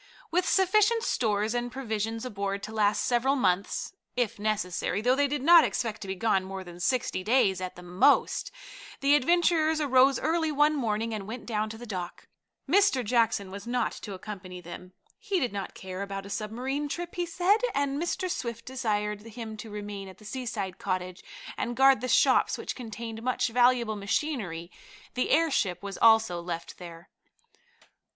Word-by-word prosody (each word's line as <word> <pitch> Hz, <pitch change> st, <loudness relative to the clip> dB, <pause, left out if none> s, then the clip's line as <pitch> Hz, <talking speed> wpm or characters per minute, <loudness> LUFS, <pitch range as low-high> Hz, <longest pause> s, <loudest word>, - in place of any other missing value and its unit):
With 360 Hz, +2 st, +1 dB
sufficient 425 Hz, +4 st, +3 dB
stores 215 Hz, -, 0 dB
and 240 Hz, 0 st, -2 dB
provisions 225 Hz, -3 st, -3 dB
aboard 200 Hz, -3 st, -3 dB
to -, -, -6 dB
last 210 Hz, -1 st, +2 dB
several 255 Hz, +3 st, +2 dB
months, 195 Hz, -, 0 dB, 0.2 s
if 245 Hz, -5 st, -1 dB
necessary, 205 Hz, -3 st, -1 dB
though 245 Hz, +4 st, +3 dB
they 285 Hz, +1 st, +2 dB
did 285 Hz, -1 st, -3 dB
not 335 Hz, +1 st, +8 dB
expect 225 Hz, -5 st, -2 dB
to 195 Hz, -, -6 dB
be 190 Hz, -, -3 dB
gone 190 Hz, -1 st, +1 dB
more 190 Hz, 0 st, -6 dB
than 175 Hz, -1 st, -11 dB
sixty 235 Hz, -2 st, 0 dB
days 200 Hz, -4 st, +2 dB
at 185 Hz, -1 st, -5 dB
most, 180 Hz, +1 st, +2 dB, 0.5 s
the 280 Hz, +1 st, +4 dB
adventurers 320 Hz, +1 st, +3 dB
arose 270 Hz, -2 st, +4 dB
early 320 Hz, +1 st, 0 dB
one 300 Hz, +1 st, +3 dB
morning 225 Hz, -3 st, -1 dB
and 205 Hz, -2 st, -5 dB
went 230 Hz, +2 st, -7 dB
down 215 Hz, -2 st, -1 dB
to 220 Hz, -, -8 dB
the 240 Hz, -, -9 dB
dock. 180 Hz, -5 st, -6 dB, 0.4 s
Mr. 335 Hz, -, +3 dB
Jackson 215 Hz, -4 st, +1 dB
was 200 Hz, +4 st, -8 dB
not 245 Hz, -1 st, 0 dB
to 200 Hz, -3 st, -8 dB
accompany 185 Hz, -2 st, -8 dB
them. 180 Hz, +1 st, -10 dB, 0.3 s
He 410 Hz, -4 st, -1 dB
did 245 Hz, -, -1 dB
not 200 Hz, -2 st, -5 dB
care 185 Hz, 0 st, -7 dB
about 195 Hz, 0 st, -5 dB
a 200 Hz, -, -9 dB
submarine 255 Hz, +8 st, -3 dB
trip, 345 Hz, +3 st, -5 dB
he 350 Hz, -1 st, -2 dB
said, 360 Hz, +5 st, +3 dB, 0.2 s
and 280 Hz, +1 st, 0 dB
Mr. 345 Hz, +2 st, -1 dB
Swift 235 Hz, -9 st, -4 dB
desired 210 Hz, -5 st, -2 dB
him 225 Hz, 0 st, -8 dB
to 220 Hz, +1 st, -8 dB
remain 205 Hz, -1 st, -6 dB
at 190 Hz, -, -13 dB
the 215 Hz, -, -16 dB
seaside 215 Hz, -5 st, -4 dB
cottage 185 Hz, -1 st, -3 dB, 0.3 s
and 240 Hz, 0 st, -3 dB
guard 270 Hz, -3 st, +6 dB
the 255 Hz, -, -2 dB
shops, -, -, +4 dB
which -, -, -5 dB
contained 225 Hz, -2 st, -7 dB
much 250 Hz, 0 st, 0 dB
valuable 240 Hz, -2 st, +3 dB
machinery. 200 Hz, -, -2 dB, 0.4 s
The 250 Hz, -, -1 dB
airship 270 Hz, -, +2 dB
was 200 Hz, -1 st, -6 dB
also 220 Hz, -6 st, +5 dB
left 170 Hz, -1 st, -6 dB
there. 170 Hz, 0 st, -11 dB
225 Hz, 175 wpm, -28 LUFS, 200-270 Hz, 0.5 s, not